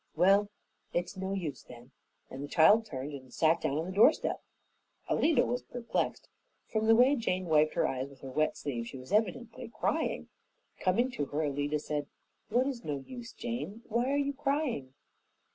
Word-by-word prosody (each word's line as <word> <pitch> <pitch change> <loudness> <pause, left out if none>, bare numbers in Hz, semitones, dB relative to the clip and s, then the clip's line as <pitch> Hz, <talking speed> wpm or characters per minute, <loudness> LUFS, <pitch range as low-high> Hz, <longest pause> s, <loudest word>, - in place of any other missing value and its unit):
Well, 195 +5 +4 0.4
it's 175 0 -1
no 190 +1 -3
use 160 -9 -3
then," 120 +1 -14 0.4
and 135 - -6
the - - -5
child 210 +10 +5
turned 140 -3 -5
and 130 -2 -9
sat 165 +1 +3
down 150 -2 0
on 160 - -1
the 185 - -5
doorstep. 215 +11 +4 0.7
Alida 300 -5 +3
was 245 +1 -1
perplexed. 240 -1 -3 0.4
From 220 0 +1
the 225 - +7
way 255 +5 +6
Jane 185 -7 -1
wiped 155 -2 +3
her - - +2
eyes 130 +1 -3
with 140 -2 -17
her 135 - -7
wet 155 +3 +1
sleeve, 120 -5 -4
she 135 - -8
was 130 +5 -11
evidently 225 +3 0
crying. - - -1 0.5
Coming 235 +8 +2
to 145 -12 -2
her, 150 +3 -2
Alida 145 +1 0
said, 150 -1 -3 0.4
"What 250 +2 +3
is 260 -4 -3
no 145 -2 -3
use, 245 -2 -8
Jane? 230 -2 -5
Why 240 +3 +1
are 280 - +2
you 280 0 0
crying?" 275 - -1
185 Hz, 180 wpm, -31 LUFS, 145-240 Hz, 0.7 s, the